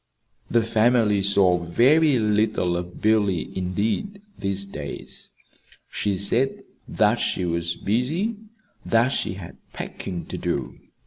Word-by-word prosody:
The 115 -1 +3
family 110 -2 +3
saw 95 -3 +3
very 135 - +4
little 105 -4 +1
of 90 0 -6
Billy, 105 -5 +1
indeed, 105 - -2 0.2
these 100 0 -2
days. 75 -7 -8 0.6
She 100 -2 -1
said 115 +8 0 0.2
that - - +2
she 90 - -1
was 85 0 -1
busy; 155 - -1 0.5
that 115 +2 +3
she 95 - -2
had 90 -3 -10 0.2
packing 90 -3 -6
to - - -6
do. - - -3
105 Hz, 120 wpm, -24 LUFS, 90-120 Hz, 0.6 s, very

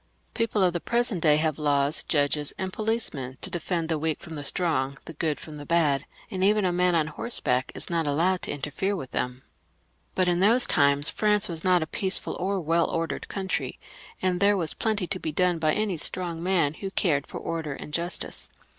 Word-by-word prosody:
English - - -39
people 225 -4 +1
of 180 -2 +3
the 175 - -1
present 235 -3 0
day 150 -2 +5
have 155 -1 +1
laws, 145 0 +1
judges, 145 -1 +1
and 185 0 -4
policemen 210 - -2
to - - -2
defend 170 -1 -2
the 160 -2 -1
weak 155 -1 -1
from 165 - -10
the 145 -2 -5
strong, 140 -4 0
the 165 - -8
good 155 -1 -2
from 155 -2 -10
the 145 - -8
bad, 150 -4 +2 0.2
and 185 -1 -2
even 210 0 +4
a 180 - +2
man 180 0 +3
on 160 -2 +3
horseback 145 - -2
is - - 0
not 165 -3 -1
allowed 175 +6 +1
to - - -6
interfere 150 +8 -2
with 135 -9 -7
them; 125 +1 -3 0.7
but 185 -1 +2
in 175 0 +2
those 230 +6 +5
times 140 0 +5
France 210 -1 +2
was 165 -2 -3
not 180 -2 +3
a - - -4
peaceful 190 +4 +1
or 195 +2 -1
well 165 0 +1
ordered 165 -3 -3
country, 190 -2 -3 0.4
and 180 -1 +1
there 200 +1 +4
was 165 -4 0
plenty 215 -4 -1
to 185 +1 -3
be 160 - -3
done 180 +1 +1
by 155 -1 +2
any 205 -1 0
strong 170 +1 -2
man 170 -5 +2
who 195 +4 -6
cared 155 -7 0
for - - -7
order 160 -3 -4
and 150 - -9
justice. 170 +2 -2
170 Hz, 210 wpm, -26 LUFS, 150-190 Hz, 0.7 s, day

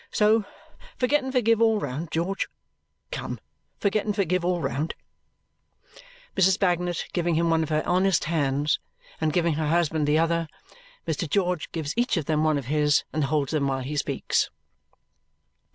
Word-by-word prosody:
So 215 0 +3 0.5
forget 275 +3 +2
and 265 - -3
forgive 230 -3 +3
all 225 -2 +4
round, 145 +1 -4
George. 175 +5 -1 0.6
Come! - - -4 0.4
Forget 205 +1 +1
and 210 -1 -2
forgive 185 -3 +1
all 180 0 +1
round!" 150 0 -2 1.4
Mrs. 190 0 +4
Bagnet, 175 -3 0
giving 175 -2 +1
him 165 +1 +2
one 165 0 +3
of 160 - -2
her 155 0 +1
honest 185 0 +2
hands 145 -2 +1 0.4
and 155 -1 +2
giving 170 0 +2
her 155 0 -1
husband 160 -2 +1
the 150 +1 +3
other, 165 0 +1 0.6
Mr. 160 0 -2
George 180 -2 0
gives 155 -3 -3
each 240 -4 +1
of 160 - -1
them 155 0 +1
one 155 -1 +3
of 140 - -4
his 150 +2 +2
and 155 -2 +1
holds 140 -1 0
them 150 -3 +1
while 135 -1 -1
he 140 +4 -4
speaks. 145 - 0
165 Hz, 165 wpm, -26 LUFS, 150-190 Hz, 1.4 s, all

